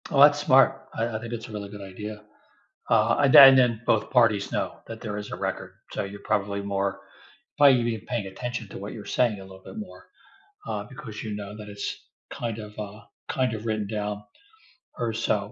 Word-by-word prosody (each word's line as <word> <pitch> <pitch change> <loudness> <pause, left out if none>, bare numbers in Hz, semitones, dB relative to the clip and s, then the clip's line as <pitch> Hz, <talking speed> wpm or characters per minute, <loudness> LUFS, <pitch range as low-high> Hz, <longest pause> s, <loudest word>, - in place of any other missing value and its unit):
Oh, 140 -4 +3
that's 145 0 +8
smart. 135 -2 +4
I 115 - 0
I - - -1
think 115 +1 -7
it's 115 -1 -5
a - - -11
really 105 -2 -6
good 105 0 -9
idea. 105 +2 -8 0.7
Uh, 115 +1 +4
a 140 -1 +4
th 135 +1 +11
then 120 -4 +3
both 110 - +2
parties 115 -6 +3
know - - 0 0.2
that 115 0 -8
there 105 -2 -4
is 105 - -7
a - - -4
record - - -4 0.2
so, - - -2
you're 100 +1 -10
probably 100 0 0
more 100 -1 -2 0.6
probably 140 -3 +7
even 115 -3 -2
paying 120 -5 -2
attention 120 +3 -5
to - - -8
what 100 +1 -6
you're 105 - -6
saying 115 -5 +2
a - - -9
little 95 0 -13
bit - - -10
more, 210 -3 -9 0.6
uh, - - -3
because 125 -7 -9
you 110 -1 -4
know 105 0 -7
that 105 -1 -9
it's, 100 0 -4 0.4
kind 115 -2 -4
of, 105 -1 -8
uh 105 0 -7 0.3
kind 130 -3 0
of, 110 +1 -6
written 110 -2 -1
down 105 0 -3 0.8
or 120 -2 -1
so. 110 -1 +1
110 Hz, 210 wpm, -26 LUFS, 105-120 Hz, 0.8 s, th